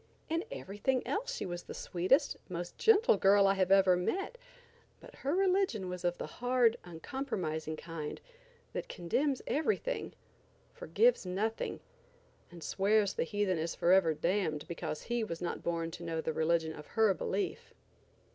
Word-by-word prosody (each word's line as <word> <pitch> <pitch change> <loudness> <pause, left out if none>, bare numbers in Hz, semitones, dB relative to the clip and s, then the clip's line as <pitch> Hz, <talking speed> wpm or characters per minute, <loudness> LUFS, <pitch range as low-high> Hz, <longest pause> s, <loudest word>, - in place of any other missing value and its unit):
In 330 +2 0
everything 250 - -2
else - - -2
she - - -4
was 175 -1 -4
the - - -9
sweetest, 190 - +2
most 175 0 -5
gentle 445 - +5
girl 195 +1 +5
I 195 0 +4
ever 190 -1 +5
met, 385 - -2 0.6
but - - -14
her 280 +5 -1
religion 370 - +1
was 180 0 -5
of 175 0 0
the - - -4
hard, 245 -2 +2
uncompromising 165 - -4
kind, 160 -2 -6 0.5
that - - -4
condemns 260 - -1
everything, 435 - -1 0.6
forgives - - +2
nothing, 200 +5 -2 0.7
and 170 -2 -11
swears 200 +1 +2
the - - 0
heathen 200 -2 0
is 165 +1 -2
forever 175 -3 +4
damned 165 -2 -1
because 160 -2 -4
he 240 -1 -1
was 165 -6 -4
not 175 - -3
born 165 -1 -2
to 175 +1 -8
know 165 -1 -2
the 160 0 -2
religion 160 0 +1
of 150 -1 -10
her 220 -3 +3
belief. 195 +2 -3
190 Hz, 150 wpm, -32 LUFS, 170-255 Hz, 0.7 s, gentle